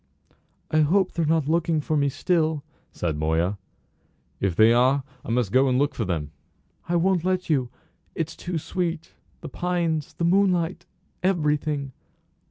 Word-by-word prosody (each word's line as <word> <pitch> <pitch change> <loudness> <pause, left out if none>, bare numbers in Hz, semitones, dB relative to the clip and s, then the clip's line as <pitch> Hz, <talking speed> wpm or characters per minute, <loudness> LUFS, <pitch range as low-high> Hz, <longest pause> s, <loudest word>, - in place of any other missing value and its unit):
"I 155 - +3
hope 180 +6 +3
they're 165 - -1
not 160 -2 +2
looking 165 0 +1
for 155 +1 -1
me 140 -1 +2
still," 160 0 0 0.3
said 80 -4 -3
Moya. 80 +6 0 0.8
"If 95 -4 0
they 110 +3 +6
are 130 +3 +3 0.2
I - - -9
must 115 -4 0
go 130 +3 +4
and 125 - +2
look 145 +2 +1
for 115 - -2
them." 80 -5 -3 0.6
"I 175 - +1
won't 180 0 +2
let 185 -2 0
you. 130 -5 +1 0.5
It's 160 -1 -3
too 175 -1 -4
sweet 170 0 -3 0.3
the - - -7
pines 170 -4 -2
the 170 - -1
moonlight 180 -1 +2 0.3
everything." 150 -6 0
155 Hz, 155 wpm, -25 LUFS, 130-170 Hz, 0.8 s, they